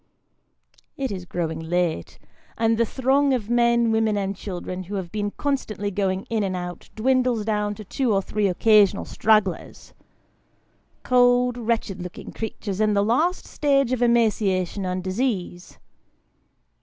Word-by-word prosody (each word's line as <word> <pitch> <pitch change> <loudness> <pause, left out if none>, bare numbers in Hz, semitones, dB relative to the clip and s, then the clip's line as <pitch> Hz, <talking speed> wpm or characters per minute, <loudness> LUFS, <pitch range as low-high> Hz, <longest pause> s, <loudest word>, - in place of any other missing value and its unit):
It 265 -4 -2
is 185 -2 -5
growing 165 -3 -3
late, 165 - -2 0.4
and 225 0 +2
the 230 - +3
throng 270 +2 +2
of 225 -2 -4
men, 235 -1 +3
women, 220 -1 +1
and 195 0 -2
children, 185 -1 -6
who 200 +4 -6
have 185 -3 -4
been 205 -1 -2
constantly 215 -6 -3
going 190 -1 -1
in 225 -2 -2
and 190 -2 -1
out, 175 -1 -6
dwindles 250 -1 +1
down 210 -1 -1
to 215 - -9
two 250 +4 -1
or 195 - +3
three 210 0 0
occasional 205 +1 +4
stragglers 210 -5 0 1.1
cold, 245 0 +3
wretched 225 -5 -2
looking 180 0 -8
creatures, 215 -2 -4
in 210 -1 +2
the 200 0 +2
last 315 - +1
stage 275 -3 +1
of 255 -1 -1
emaciation 205 -5 +1
and 180 0 -3
disease. 185 -3 -3
215 Hz, 145 wpm, -23 LUFS, 185-235 Hz, 1.1 s, occasional